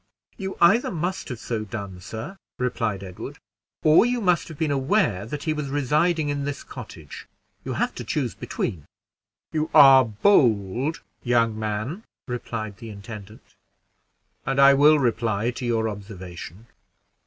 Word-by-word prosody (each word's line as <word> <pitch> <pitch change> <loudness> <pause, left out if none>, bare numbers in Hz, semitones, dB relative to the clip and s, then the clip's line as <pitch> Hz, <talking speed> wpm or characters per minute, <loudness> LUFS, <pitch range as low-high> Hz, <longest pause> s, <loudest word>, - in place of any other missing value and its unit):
"You 190 -3 -5
either 175 +8 +5
must 180 +2 -3
have 125 - -4
so 110 -1 -3
done, 100 -3 -7
sir." 115 - -7 0.2
replied 115 -5 -2
Edward, 90 -2 -8 0.5
"or 155 +4 +6
you 245 +1 0
must 180 -5 +2
have 160 - -10
been 155 -1 0
aware 135 - +1
that 145 +4 -5
he 155 - 0
was 150 -2 -4
residing 150 +3 +1
in 145 -1 -2
this 145 0 -4
cottage: 95 - -10 0.4
you - - -4
have - - -1
to - - -6
choose - - -2
between." 75 -6 -4 0.7
"You 155 0 -1
are 135 -1 +9
bold, 120 - +2 0.2
young 115 -2 +2
man," 110 - -3 0.2
replied 115 -4 -5
the 115 - -9
intendant, 105 +1 -11 0.9
"and 135 +1 -1
I 140 0 +8
will 150 +3 +6
reply 115 -3 0
to 125 0 -5
your 115 -1 +1
observation. 95 -2 -8
125 Hz, 145 wpm, -24 LUFS, 105-150 Hz, 0.9 s, are